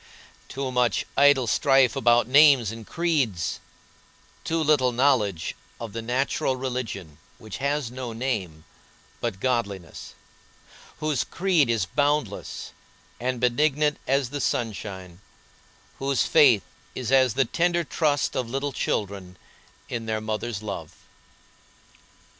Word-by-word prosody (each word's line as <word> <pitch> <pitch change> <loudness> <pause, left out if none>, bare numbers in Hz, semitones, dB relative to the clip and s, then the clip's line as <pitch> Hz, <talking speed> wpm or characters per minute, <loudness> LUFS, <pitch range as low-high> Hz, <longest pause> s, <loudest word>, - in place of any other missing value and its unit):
Too 135 -1 -4
much 125 -1 +1
idle 140 -2 +5
strife 135 +1 +3
about 120 0 +3
names 135 -5 +6
and 115 -1 -9
creeds; 140 - -1 0.8
too 165 0 0
little 145 -5 +3
knowledge 120 - +1 0.2
of 115 -3 -7
the 115 - -4
natural 130 +2 0
religion 115 - -5 0.2
which 110 -3 -8
has 140 -3 -1
no 125 -1 -6
name 110 -10 -3 0.6
but 115 -5 -3
godliness, 100 -8 -3 0.9
whose 150 -6 0
creed 175 -8 +1
is 115 -5 +1
boundless 145 +8 -1 0.5
and 125 0 -2
benignant 150 +4 +1
as 135 -2 +1
the 145 -1 -3
sunshine, 95 -7 -3 0.8
whose 135 -2 +1
faith 130 - +5 0.3
is 125 -1 -3
as 130 -4 +4
the 135 0 +3
tender 175 +6 +1
trust 150 -2 0
of 125 -3 -2
little 135 +3 -2
children 95 -6 -3 0.5
in 115 -2 -5
their 110 0 -1
mother's 110 0 -4
love. 105 - -6
125 Hz, 120 wpm, -25 LUFS, 110-140 Hz, 0.9 s, names